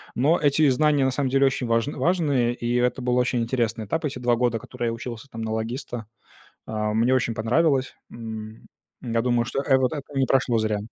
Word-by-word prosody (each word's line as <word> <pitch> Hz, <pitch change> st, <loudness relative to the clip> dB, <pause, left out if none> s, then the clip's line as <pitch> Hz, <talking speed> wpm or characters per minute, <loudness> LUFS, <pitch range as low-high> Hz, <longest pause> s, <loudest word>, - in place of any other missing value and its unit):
но 150 Hz, +8 st, +3 dB
эти 145 Hz, 0 st, +3 dB
знания 145 Hz, +1 st, +3 dB
на 130 Hz, -, +2 dB
самом 130 Hz, 0 st, -1 dB
деле 135 Hz, +1 st, +3 dB
очень 130 Hz, -2 st, 0 dB
важн 115 Hz, +5 st, 0 dB
важные, 145 Hz, -9 st, +1 dB
и 120 Hz, 0 st, -2 dB
это 125 Hz, +1 st, +1 dB
был 125 Hz, 0 st, 0 dB
очень 125 Hz, -1 st, +1 dB
интересный 115 Hz, -2 st, -1 dB
этап. 160 Hz, +10 st, -2 dB
Эти 135 Hz, -3 st, -3 dB
2 120 Hz, -1 st, +2 dB
года, 120 Hz, -2 st, 0 dB
которые 120 Hz, 0 st, -5 dB
я 115 Hz, -, -1 dB
учился 115 Hz, +2 st, -7 dB
там 115 Hz, -, -7 dB
на 110 Hz, 0 st, -3 dB
логиста, 115 Hz, +1 st, -4 dB, 0.6 s
а, 105 Hz, -1 st, -2 dB
мне 115 Hz, +4 st, +3 dB
очень 120 Hz, -3 st, 0 dB
понравилось. 130 Hz, +4 st, +1 dB, 0.2 s
М, 110 Hz, -1 st, -8 dB, 0.4 s
я 115 Hz, -1 st, 0 dB
думаю, 120 Hz, -1 st, +1 dB
что 135 Hz, -, -2 dB
э 135 Hz, -2 st, +4 dB
вот 130 Hz, +3 st, +1 dB
это 145 Hz, -, -4 dB, 0.2 s
не 135 Hz, -, +3 dB
прошло 125 Hz, -3 st, +2 dB
зря. 110 Hz, -1 st, 0 dB
125 Hz, 210 wpm, -24 LUFS, 115-135 Hz, 0.6 s, э